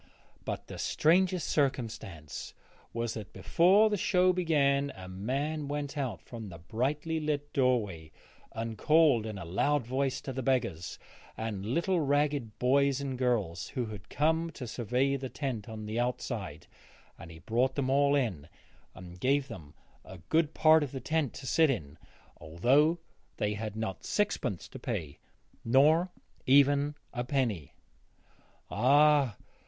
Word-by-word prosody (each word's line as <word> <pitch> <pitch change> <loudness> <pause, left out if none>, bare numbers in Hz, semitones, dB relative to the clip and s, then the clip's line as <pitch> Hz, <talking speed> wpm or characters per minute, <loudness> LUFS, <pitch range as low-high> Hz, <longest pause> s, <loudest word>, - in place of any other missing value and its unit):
But - - -4
the - - -9
strangest 180 +1 +2
circumstance 115 - -3 0.4
was 115 -1 -2
that 110 -3 -8
before 175 - +4
the 205 - +1
show 185 -1 +3
began 140 -5 +2
a 95 - -9
man 140 +11 -3
went 145 0 -4
out 120 - -3
from 110 +1 -8
the 85 - -9
brightly 140 - -2
lit 145 -1 -3
doorway 105 - 0 0.4
and 115 -1 -5
called 150 -8 +4
in 110 -2 -5
a 95 - -7
loud 135 - +1
voice 130 +2 -1
to 135 - -6
the 130 - -3
beggars 100 -10 -1 0.4
and 110 -3 -4
little 170 - 0
ragged 145 -5 0
boys 140 +2 +2
and 140 -2 -3
girls 105 -10 -1
who 125 - -3
had 105 -4 -9
come 160 +2 +1
to 130 - -7
survey 125 +4 0
the 130 -1 -6
tent 125 -8 -4
on 110 -1 -7
the 110 +2 -3
outside, 125 +1 -3 0.5
and 85 - -10
he 80 - -11
brought 120 +10 0
them 135 -2 0
all 140 +1 +4
in 95 - -1 0.5
and 90 -1 -11
gave 140 +5 +1
them 75 -4 -10 0.3
a 95 - -11
good 160 -1 +2
part 155 0 +6
of 145 -3 -3
the 135 - -4
tent 155 -2 -1
to 135 - -8
sit 160 +4 +3
in, 75 - -3 0.4
although 135 - +2 0.4
they 105 0 0
had 105 0 -5
not 110 -4 -4
sixpence 200 - -1
to - - -10
pay, 75 -3 -4 0.4
nor 150 +9 +4 0.4
even 140 +2 +4 0.2
a 120 - -2
penny. 120 - -2 1.0
Ah! 140 0 +4
130 Hz, 150 wpm, -30 LUFS, 110-145 Hz, 1.0 s, part